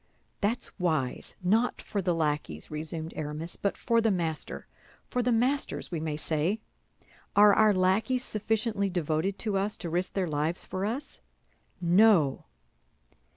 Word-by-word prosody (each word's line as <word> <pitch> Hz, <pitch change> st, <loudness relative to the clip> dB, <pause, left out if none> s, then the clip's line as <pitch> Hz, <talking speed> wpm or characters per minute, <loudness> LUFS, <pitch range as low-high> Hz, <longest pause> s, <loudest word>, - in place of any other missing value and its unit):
"That's 225 Hz, +4 st, -1 dB
wise—not 180 Hz, -, 0 dB
for 200 Hz, -, -3 dB
the 180 Hz, -2 st, +1 dB
lackeys," 150 Hz, -, -2 dB
resumed 160 Hz, +1 st, -4 dB
Aramis, 155 Hz, +3 st, -4 dB
"but 200 Hz, -, -2 dB
for 230 Hz, 0 st, +2 dB
the 225 Hz, -, +3 dB
master—for 175 Hz, -, -4 dB
the 245 Hz, +1 st, +1 dB
masters, 250 Hz, +2 st, 0 dB
we 170 Hz, -, -2 dB
may 155 Hz, -1 st, -3 dB
say. 160 Hz, +7 st, 0 dB, 0.8 s
Are 205 Hz, 0 st, +8 dB
our 215 Hz, 0 st, +5 dB
lackeys 200 Hz, +7 st, +2 dB
sufficiently 215 Hz, -2 st, -1 dB
devoted 175 Hz, +2 st, -1 dB
to 205 Hz, -3 st, -1 dB
us 205 Hz, +2 st, -1 dB
to 170 Hz, -, -5 dB
risk 180 Hz, +2 st, -1 dB
their 190 Hz, -2 st, 0 dB
lives 155 Hz, +3 st, -1 dB
for 190 Hz, +1 st, -3 dB
us? 270 Hz, +6 st, -5 dB, 0.6 s
No." 175 Hz, -5 st, +4 dB
185 Hz, 135 wpm, -29 LUFS, 160-215 Hz, 0.8 s, Are